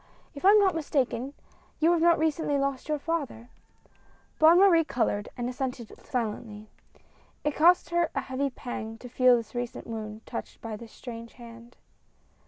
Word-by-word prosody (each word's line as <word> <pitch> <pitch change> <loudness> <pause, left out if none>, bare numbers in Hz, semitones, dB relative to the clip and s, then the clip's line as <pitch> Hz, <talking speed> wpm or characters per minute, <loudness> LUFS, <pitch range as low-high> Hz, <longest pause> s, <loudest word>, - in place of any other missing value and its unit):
If 280 - -10
I 385 - +7
am 420 - +8
not 390 -3 +3
mistaken 280 -4 -1 0.4
you 325 +2 +4
have 340 0 +4
recently 310 -2 0
lost 275 0 -2
your 305 - +1
father? 285 -7 -4 0.4
" - - -34
Bonne 320 +2 +7
Marie 360 -4 +6
colored 205 -7 -1
and 240 0 -2
assented 250 -2 -4
silently. 215 -2 -4 0.7
It 295 -1 -1
cost 345 +3 +4
her 345 -1 +2
a - - 0
heavy 270 +2 -2
pang 225 -3 -6
to 250 - -10
feel 250 0 +4
this 230 -2 -7
recent 245 -1 -5
wound 220 -1 -7
touched 235 - -7
by 225 -1 -6
this 225 +1 -11
strange 230 -2 -9
hand. 235 0 -13
255 Hz, 165 wpm, -27 LUFS, 230-315 Hz, 0.7 s, am